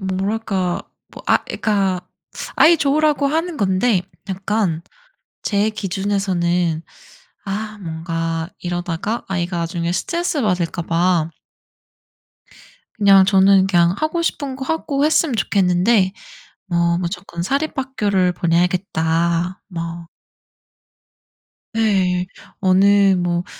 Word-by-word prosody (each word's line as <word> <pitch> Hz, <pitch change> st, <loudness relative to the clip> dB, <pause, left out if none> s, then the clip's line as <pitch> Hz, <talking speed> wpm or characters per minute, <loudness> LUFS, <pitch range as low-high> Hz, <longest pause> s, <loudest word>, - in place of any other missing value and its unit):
뭐랄까 190 Hz, -1 st, -2 dB, 0.3 s
뭐 -, -, -12 dB
아 -, -, +4 dB
그러니까 195 Hz, -4 st, 0 dB, 0.6 s
아이 335 Hz, +2 st, +6 dB
좋으라고 295 Hz, 0 st, +2 dB
하는 325 Hz, +3 st, -1 dB
건데 190 Hz, 0 st, +2 dB, 0.3 s
약간 195 Hz, -3 st, -1 dB, 0.6 s
제 205 Hz, +1 st, +1 dB
기준에서는 185 Hz, -5 st, -1 dB, 0.6 s
아 215 Hz, +2 st, -4 dB
뭔가 165 Hz, 0 st, -3 dB
이러다가 175 Hz, +5 st, -3 dB
아이가 175 Hz, -2 st, -2 dB
나중에 170 Hz, 0 st, -2 dB
스트레스 340 Hz, -, -1 dB
받을까 175 Hz, -4 st, -1 dB
봐 170 Hz, -1 st, +1 dB, 1.7 s
그냥 195 Hz, -2 st, +6 dB
저는 195 Hz, 0 st, +5 dB
그냥 175 Hz, -2 st, +3 dB
하고 315 Hz, +2 st, -1 dB
싶은 280 Hz, -5 st, -2 dB
거 265 Hz, -, -5 dB
하고 290 Hz, -1 st, -1 dB
했으면 310 Hz, -2 st, +2 dB
좋겠는데 190 Hz, 0 st, +2 dB, 0.5 s
뭐 170 Hz, -1 st, +1 dB
"무조건 175 Hz, -1 st, -4 dB
사립학교를 260 Hz, -, 0 dB
보내야겠다." 170 Hz, 0 st, 0 dB
뭐 170 Hz, -2 st, -6 dB, 1.7 s
네. 190 Hz, -5 st, +1 dB, 0.3 s
어느 195 Hz, +1 st, +4 dB
뭐 175 Hz, -1 st, -1 dB
190 Hz, 220 characters per minute, -20 LUFS, 175-215 Hz, 1.7 s, 아이